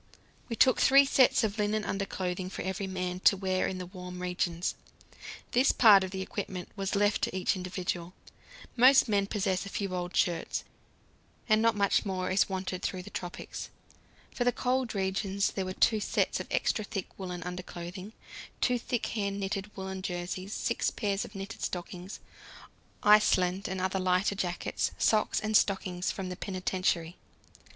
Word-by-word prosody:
We 230 Hz, -, -2 dB
took 255 Hz, +2 st, +5 dB
three 275 Hz, +1 st, +7 dB
sets 265 Hz, -3 st, +4 dB
of 215 Hz, 0 st, -1 dB
linen 210 Hz, +1 st, +1 dB
underclothing 185 Hz, -2 st, -3 dB
for -, -, -5 dB
every 190 Hz, +1 st, -3 dB
man, 185 Hz, -1 st, -3 dB
to 195 Hz, -, +5 dB
wear 185 Hz, -1 st, 0 dB
in 190 Hz, -, -3 dB
the 180 Hz, -, -5 dB
warm 180 Hz, 0 st, -8 dB
regions. 180 Hz, -1 st, -1 dB, 0.8 s
This 255 Hz, +3 st, +4 dB
part 205 Hz, -5 st, +7 dB
of 190 Hz, -, -3 dB
the 190 Hz, 0 st, -4 dB
equipment 190 Hz, -2 st, -5 dB
was 195 Hz, 0 st, -2 dB
left 205 Hz, +1 st, +2 dB
to -, -, -1 dB
each 185 Hz, -, +1 dB
individual; 180 Hz, -1 st, -4 dB, 0.6 s
most 255 Hz, +2 st, +7 dB
men 200 Hz, -2 st, +1 dB
possess 190 Hz, -3 st, 0 dB
a 200 Hz, -, -7 dB
few 200 Hz, -2 st, -3 dB
old 180 Hz, 0 st, -3 dB
shirts, 170 Hz, -4 st, 0 dB, 0.8 s
and 215 Hz, -1 st, +4 dB
not 230 Hz, 0 st, +3 dB
much 200 Hz, -1 st, +2 dB
more 185 Hz, -2 st, -2 dB
is 190 Hz, +2 st, +3 dB
wanted 185 Hz, -1 st, -3 dB
through 185 Hz, -2 st, -3 dB
the 205 Hz, -, -11 dB
tropics. 175 Hz, -1 st, -6 dB, 0.6 s
For 245 Hz, -, 0 dB
the 245 Hz, -, +3 dB
cold 255 Hz, -2 st, -1 dB
regions 195 Hz, +1 st, 0 dB
there 190 Hz, -, -3 dB
were 185 Hz, -, -4 dB
two 220 Hz, +3 st, +3 dB
sets -, -, 0 dB
of -, -, -6 dB
extra 215 Hz, -, 0 dB
thick 195 Hz, -2 st, -4 dB
woollen 180 Hz, -2 st, -5 dB
underclothing, 180 Hz, +2 st, -7 dB, 0.5 s
two 250 Hz, -1 st, +2 dB
thick 235 Hz, 0 st, -2 dB
hand 200 Hz, -2 st, -2 dB
knitted 195 Hz, +1 st, -3 dB
woollen 190 Hz, 0 st, -5 dB
jerseys, 185 Hz, +1 st, -4 dB
six 235 Hz, -, 0 dB
pairs 200 Hz, -3 st, -2 dB
of 210 Hz, -, -13 dB
knitted 195 Hz, 0 st, -7 dB
stockings, 180 Hz, +1 st, -5 dB, 0.8 s
Iceland 200 Hz, -2 st, +4 dB
and 190 Hz, 0 st, -3 dB
other 190 Hz, +1 st, 0 dB
lighter 185 Hz, +2 st, +2 dB
jackets, 180 Hz, -3 st, -2 dB
socks 215 Hz, -1 st, +2 dB
and 215 Hz, 0 st, -1 dB
stockings 185 Hz, -3 st, +2 dB
from 190 Hz, -2 st, -4 dB
the 180 Hz, -, -4 dB
penitentiary. 185 Hz, -3 st, -1 dB
190 Hz, 165 wpm, -30 LUFS, 185-210 Hz, 0.8 s, three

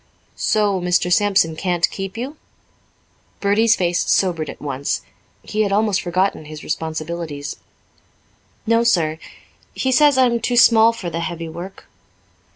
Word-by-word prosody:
"So 205 Hz, -3 st, +1 dB
Mr. 180 Hz, 0 st, +1 dB
Sampson 195 Hz, -5 st, +2 dB
can't 175 Hz, 0 st, 0 dB
keep 195 Hz, +2 st, -6 dB
you?" 265 Hz, +6 st, -5 dB, 1.0 s
Bertie's 220 Hz, +3 st, +3 dB
face 175 Hz, -1 st, 0 dB
sobered 170 Hz, -5 st, +1 dB
at -, -, -9 dB
once. 140 Hz, -1 st, -3 dB, 0.4 s
He 215 Hz, -, -2 dB
had 205 Hz, -2 st, 0 dB
almost 205 Hz, -1 st, +1 dB
forgotten 185 Hz, -2 st, -1 dB
his 155 Hz, 0 st, -9 dB
responsibilities. 160 Hz, -2 st, -4 dB, 1.1 s
"No, 230 Hz, +1 st, +3 dB
sir. 160 Hz, -9 st, +1 dB, 0.6 s
He 260 Hz, -, 0 dB
says 290 Hz, +1 st, +4 dB
I'm 245 Hz, -2 st, +3 dB
too 245 Hz, +1 st, -1 dB
small 230 Hz, -1 st, +6 dB
for 185 Hz, -7 st, -6 dB
the 165 Hz, -, -3 dB
heavy 165 Hz, -1 st, -5 dB
work." 180 Hz, +4 st, -9 dB
185 Hz, 135 wpm, -20 LUFS, 165-220 Hz, 1.1 s, small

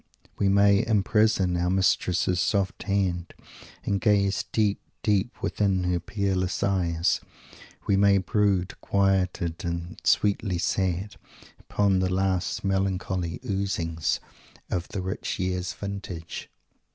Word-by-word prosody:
We 100 Hz, -, +3 dB
may 100 Hz, +1 st, +5 dB
"imprison 105 Hz, -3 st, +2 dB
our 90 Hz, +1 st, 0 dB
mistress's 90 Hz, -1 st, +2 dB
soft 100 Hz, 0 st, 0 dB
hand, 90 Hz, -3 st, -1 dB, 0.5 s
and 100 Hz, -1 st, 0 dB
gaze, 100 Hz, -2 st, +2 dB
deep, 105 Hz, -2 st, +1 dB, 0.2 s
deep, 105 Hz, +2 st, +1 dB
within 95 Hz, -3 st, +1 dB
her 90 Hz, -1 st, +1 dB
peerless 95 Hz, 0 st, -1 dB
eyes." 85 Hz, -4 st, +1 dB, 0.6 s
We 100 Hz, -, +3 dB
may 100 Hz, 0 st, +5 dB
brood, 95 Hz, -2 st, 0 dB
quieted 95 Hz, -4 st, 0 dB
and 85 Hz, 0 st, -4 dB
sweetly 100 Hz, -2 st, +2 dB
sad, 95 Hz, +2 st, -1 dB, 0.4 s
upon 100 Hz, -2 st, +1 dB
the 95 Hz, 0 st, 0 dB
last 95 Hz, -1 st, 0 dB
melancholy 95 Hz, -4 st, -1 dB
"oozings" 90 Hz, -5 st, -1 dB, 0.5 s
of 90 Hz, -1 st, -1 dB
the 95 Hz, -, -4 dB
rich 95 Hz, +3 st, -3 dB
year's 90 Hz, -1 st, -1 dB
vintage. 95 Hz, -4 st, -6 dB
95 Hz, 115 wpm, -26 LUFS, 90-100 Hz, 0.6 s, may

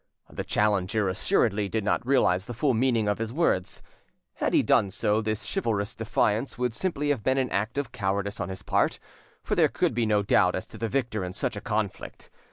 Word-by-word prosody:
The -, -, -4 dB
challenger 105 Hz, -1 st, +1 dB
assuredly 100 Hz, +2 st, +1 dB
did 110 Hz, +2 st, -1 dB
not 105 Hz, -, 0 dB
realise 120 Hz, -8 st, +2 dB
the 120 Hz, -, -7 dB
full 135 Hz, +3 st, +1 dB
meaning, 115 Hz, -2 st, +1 dB
of 105 Hz, +1 st, 0 dB
his 115 Hz, 0 st, -3 dB
words; 125 Hz, -, 0 dB, 0.5 s
had -, -, 0 dB
he -, -, +4 dB
done 100 Hz, -, +3 dB
so, 105 Hz, +3 st, 0 dB
this 110 Hz, -1 st, -2 dB
chivalrous 110 Hz, -, -1 dB
defiance 115 Hz, +2 st, 0 dB
would 125 Hz, -1 st, -1 dB
simply 150 Hz, 0 st, -1 dB
have 140 Hz, -6 st, +1 dB
been 130 Hz, +5 st, +1 dB
an 130 Hz, -2 st, 0 dB
act 110 Hz, +6 st, -1 dB
of 140 Hz, -5 st, -2 dB
cowardice 100 Hz, -2 st, -2 dB
on 85 Hz, -, -3 dB
his 95 Hz, 0 st, -7 dB
part, -, -, +1 dB, 0.5 s
for -, -, -2 dB
there -, -, +4 dB
could -, -, 0 dB
be 115 Hz, -1 st, 0 dB
no 105 Hz, -1 st, +2 dB
doubt 90 Hz, -2 st, +3 dB
as 95 Hz, -, -4 dB
to -, -, -11 dB
the 115 Hz, -, -2 dB
victor 120 Hz, -6 st, -1 dB
in 90 Hz, 0 st, -5 dB
such 100 Hz, -, -2 dB
a 105 Hz, -, -6 dB
conflict. 105 Hz, -2 st, -4 dB
110 Hz, 210 wpm, -27 LUFS, 100-120 Hz, 0.5 s, he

